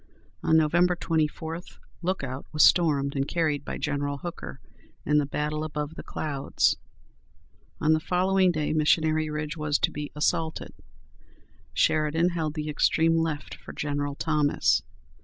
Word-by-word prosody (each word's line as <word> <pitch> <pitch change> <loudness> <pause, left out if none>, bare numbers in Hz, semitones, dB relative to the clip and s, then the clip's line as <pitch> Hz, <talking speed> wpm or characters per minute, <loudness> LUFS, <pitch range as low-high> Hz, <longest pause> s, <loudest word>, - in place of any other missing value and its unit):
On 160 - +4
Nov. 155 -2 +3
24, 165 -2 +1 0.4
Lookout 140 -8 -3
was 150 -1 +4
stormed 145 -5 +4
and 135 0 0
carried 155 -4 0
by - - -5
General 145 0 -2
Hooker 175 +4 -7 0.5
in 150 0 +3
the 145 - 0
"Battle 150 +1 -2
above 150 -1 -4
the - - -8
Clouds." 140 -3 0 1.0
On 155 +1 +3
the 155 - +2
following 185 +2 +2
day 155 -2 -1
Missionary 155 0 +2
Ridge 150 0 -3
was 150 -1 +1
to - - +1
be 150 0 -5
assaulted. 160 +1 -1 1.0
Sheridan 155 +3 +2
held 160 -3 -2
the 155 -1 -3
extreme 160 +2 +2
left 160 -3 -2
for - - -10
General 145 -1 -2
Thomas. 150 -2 +2
155 Hz, 140 wpm, -27 LUFS, 145-165 Hz, 1.0 s, On